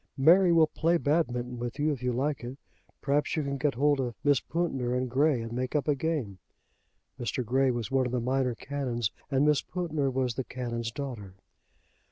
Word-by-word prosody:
"Mary 175 +6 +6
will 165 -1 +6
play 165 +2 +1
Badminton 125 -6 0
with 120 +1 -4
you, 155 +1 +1
if 135 -4 -4
you 125 0 0
like 135 +3 -1
it. 125 +3 -6 0.5
Perhaps 145 +1 +1
you 155 - 0
can 140 -1 -3
get 140 -2 +1
hold 145 +2 +2
of 120 -3 -2
Miss 145 -3 +4
Pountner 135 -8 -2
and 130 0 0
Grey; 135 +2 +2
and 115 - -7
make 125 +3 -3
up 150 - +1
a 150 - +4
game." 140 - -2 0.8
Mr. 120 +1 -2
Grey 130 +3 +2
was 120 -1 -2
one 130 -1 +2
of - - -5
the 125 - 0
minor 125 0 0
canons, 120 -4 -2 0.2
and 135 +1 +2
Miss 150 -1 +3
Pountner 155 -6 -2
was 130 -2 0
the 130 - -3
canon's 120 -2 -4
daughter. 115 -9 -6
135 Hz, 200 wpm, -29 LUFS, 120-150 Hz, 0.8 s, Mary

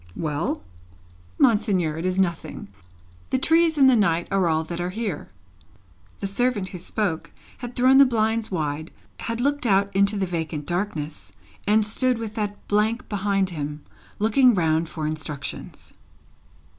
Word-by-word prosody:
"Well?" 150 - -2 0.7
"Monseigneur, 205 - +2
it 165 +3 -2
is 185 0 -1
nothing. 175 -3 -2 0.6
The - - +1
trees 325 +3 +3
and 270 -2 +7
the 260 - +6
night 170 -6 +2
are 195 -2 +2
all 160 0 +1
that 170 +2 -5
are 175 - -2
here." 220 +3 -4 0.9
The - - -2
servant 205 -1 0
who 180 - -8
spoke, 185 -2 -2 0.3
had 245 -1 -7
thrown 260 +2 +5
the 275 - +9
blinds 225 -2 0
wide, 155 -3 -3 0.3
had 230 0 -3
looked 285 0 +1
out 200 -1 +2
into 200 +2 +3
the 195 - 0
vacant 160 -4 -4
darkness, 175 -4 -3 0.4
and 215 +1 +4
stood 250 +3 +1
with 225 -2 -5
that 210 -2 -4
blank 215 +3 0
behind 195 -2 0
him, 150 -2 -5 0.3
looking 230 +3 +4
round 160 -2 +1
for 155 -3 -4
instructions. 150 -3 -6
200 Hz, 150 wpm, -24 LUFS, 165-230 Hz, 0.9 s, the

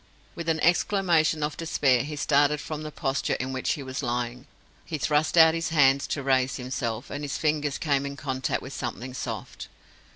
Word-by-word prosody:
With 170 -1 -4
an 160 -1 +1
exclamation 170 -3 +2
of 150 0 -2
despair, 135 -6 +2
he 150 +2 -5
started 145 +1 +2
from 155 +1 -5
the 155 - -5
posture 135 -2 -1
in 130 +1 -4
which 130 - 0
he 150 -4 -6
was 130 +1 -4
lying. 125 +1 -3 0.4
He 160 - -4
thrust 150 +3 +1
out 160 -1 +8
his 165 0 -2
hands 140 -4 +4
to 140 - -3
raise 130 -1 +2
himself, 125 -2 -4
and 145 - -4
his 145 0 -3
fingers 150 -2 0
came 140 -3 +1
in 140 0 -7
contact 130 -2 -2
with 130 - -8
something 125 +1 -5
soft. - - -6
145 Hz, 190 wpm, -26 LUFS, 130-155 Hz, 0.4 s, out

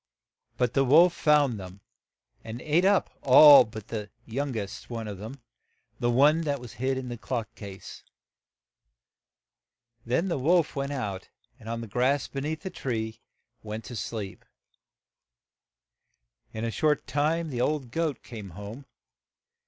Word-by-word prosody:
But 125 -1 +1
the 135 - +3
wolf 165 +7 +6
found 145 -7 +3
them, 95 +1 -10 0.6
and 115 +1 -7
ate 160 +4 +2
up 200 0 +3
all 140 0 +9
but 110 -1 -10
the 105 -2 -5 0.2
young 135 +2 -3
est 100 -2 -6
one 115 -2 -5
of 100 -3 -7
them, 115 +5 -9 0.3
— - - -44
the 120 - +1
one 145 +7 +4
that 145 -3 -1
was 120 -2 -10
hid 130 0 0
in 130 -1 -5
the 120 -2 -6
clock 115 -4 -4
case. 100 -3 -10 2.0
Then 130 +10 0
the 170 -6 -1
wolf 165 +3 +2
went 140 0 -2
out, 100 -9 -4 0.3
and 115 -1 -10
on 115 0 -3
the 115 - -7
grass 130 +6 +1
be 135 - -5
neath 155 +5 -4
and 110 -10 -4 0.4
went 110 +1 -6
to 125 - -8
sleep. 105 -3 -5 2.1
In 110 +1 -4
a 115 - -2
short 150 +3 +1
time 155 +5 0
the 120 -2 -2
old 140 -3 -1
goat 160 -3 -2
came 110 -5 -9
home. 105 +7 -8
125 Hz, 150 wpm, -27 LUFS, 110-145 Hz, 2.1 s, all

